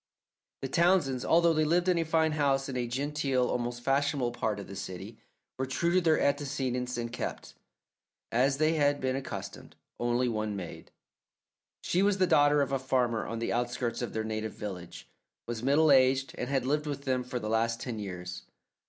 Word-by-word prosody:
The - - 0
Townsends, 165 -5 +2
although 170 0 +4
they 155 0 +2
lived 175 +4 +2
in 180 -2 +3
a - - +2
fine 160 0 +2
house 140 -3 +1
in 135 - -5
a 125 -1 -1
genteel, 135 0 0
almost 120 0 -3
fashionable, 140 -1 +1
part 110 -3 -2
of 100 - -7
the 100 - -9
city, 95 +4 -7 0.4
were 130 - -1
true 170 +6 0
to 185 - +4
their 160 -2 +3
antecedents 130 -3 -1
and 120 0 -4
kept, - - -5 0.8
as 135 +4 +2
they 155 +2 +3
had 145 -2 +2
been 130 0 -1
accustomed, 135 0 -7 0.2
only 120 +1 +1
one 110 -2 -2
maid. 90 -4 -8 0.9
She 180 - +1
was 200 0 +3
the 185 - +4
daughter 145 -4 +4
of 140 - -4
a 135 - +1
farmer 125 -3 0
on 115 - -4
the 115 - -2
outskirts 120 0 -2
of 120 - -4
their 110 - -1
native 110 -1 -3
village, 90 -5 -7 0.4
was 115 -2 -4
middle 145 +4 +4
aged, 135 0 +4
and 125 - -4
had 135 -2 0
lived 150 +3 0
with 140 -1 -4
them 130 -2 0
for 125 0 -4
the 110 -3 -4
last 115 +1 +1
ten 120 -3 -5
years. 90 -3 -6
130 Hz, 190 wpm, -30 LUFS, 120-145 Hz, 0.9 s, although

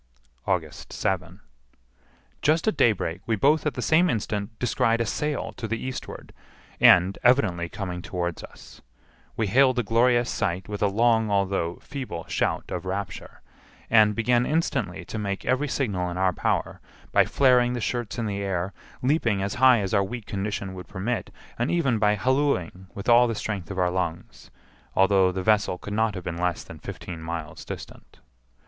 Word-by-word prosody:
August - - -2
7. - - -2 1.0
Just 160 +6 +2
at 220 - +2
daybreak 90 -7 +1
we 115 - +2
both 150 +8 +3
at 145 - -2
the 125 - -3
same 175 +3 +4
instant 105 -4 -2
descried 115 -1 +1
a 115 - +1
sail 150 +6 -2
to 110 - -4
the 115 +2 -2
eastward, 130 +3 -7 0.5
and 90 +2 +6
evidently 100 -10 +3
coming 90 -3 -5
towards 85 -2 -4
us! - - -13 0.6
We 110 - +1
hailed 130 +5 +4
the 125 - 0
glorious 120 +2 +3
sight 95 -6 -2
with 105 -1 -5
a 105 - +4
long, 110 +1 +2
although 95 -4 0
feeble 130 - -6
shout - - 0
of 90 - -3
rapture; 95 -1 -5 0.5
and 110 -2 +5
began 120 +1 +2
instantly 160 +5 -1
to 110 - -5
make 100 -2 -3
every 130 +3 +1
signal 100 -10 -1
in 90 - -5
our 95 -1 +2
power, - - -1 0.3
by - - +5
flaring 125 -2 +3
the 125 - -2
shirts 120 0 -3
in 115 - -1
the 100 -1 -3
air, 95 -1 -2 0.3
leaping 120 -8 +1
as 100 - -2
high 130 -4 +7
as 95 0 -3
our 100 -2 +4
weak 110 +3 -6
condition 100 -1 -3
would 90 -1 -9
permit, 110 +6 -3 0.3
and 120 - 0
even 135 -10 +1
by 105 0 +3
hallooing 105 - 0
with 100 - -7
all 120 +1 +6
the 115 - -2
strength 100 -6 -4
of 95 - -6
our 90 -1 +2
lungs, 90 -2 -4 0.5
although 95 -1 +4
the 95 0 -4
vessel 105 -3 +2
could 100 - -7
not 110 0 +1
have 95 - -6
been 85 -1 -4
less 90 -1 -1
than - - -11
fifteen 85 -3 -8
miles 80 -2 -6
distant. - - -10
105 Hz, 175 wpm, -25 LUFS, 95-120 Hz, 1.0 s, high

